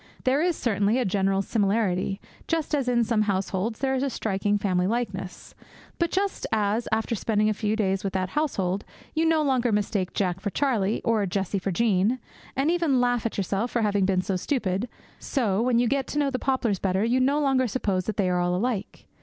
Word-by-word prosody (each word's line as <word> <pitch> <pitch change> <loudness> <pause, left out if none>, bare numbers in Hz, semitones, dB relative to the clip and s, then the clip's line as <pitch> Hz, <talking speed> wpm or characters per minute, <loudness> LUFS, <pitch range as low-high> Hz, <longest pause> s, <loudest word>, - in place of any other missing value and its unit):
There 265 +3 +2
is 350 0 +1
certainly 210 -2 +1
a 255 - +1
general 195 0 +1
similarity, 195 -2 0 0.3
just 325 -2 -1
as, 275 -4 +1
in 240 -1 +3
some 225 -1 +1
households, 200 +1 -1
there 265 -1 +1
is 260 - 0
a 275 - 0
striking 205 -3 0
family 185 -3 +1
likeness. 195 -5 -4 0.5
But 340 -1 +2
just 390 +2 -1
as, 215 +1 +1
after 220 +1 0
spending 215 -1 +1
a - - +1
few 210 0 -1
days 195 -3 0
with 195 - -2
that 185 -1 -1
household, 200 -9 -1 0.3
you 320 +1 +2
no 320 -1 +3
longer 255 -4 +1
mistake 205 -2 -1
Jack 180 -2 0
for 205 - -2
Charlie, 225 -4 0
or 220 -4 +1
Jessie 195 +1 -1
for 190 - -3
Jean, 210 +3 +2 0.4
and 275 +5 +2
even 335 -7 +2
laugh 245 -2 +1
at - - -7
yourself 200 +4 -1
for - - -2
ever 225 - +2
having 200 -2 +1
been 185 -1 +1
so 190 - -1
stupid, 205 -1 -1 0.3
so, 220 -7 0
when 245 0 +2
you 240 0 +3
get 275 +1 0
to - - -4
know 285 -2 +2
the 255 - -2
poplars 245 -7 0
better, 190 +1 0
you 245 +3 +2
no 275 +3 +2
longer 270 -3 +2
suppose 200 -5 -1
that 215 - -3
they 195 -3 +2
are 180 0 +1
all 175 0 +1
alike. 215 0 -3
215 Hz, 210 wpm, -26 LUFS, 195-255 Hz, 0.5 s, in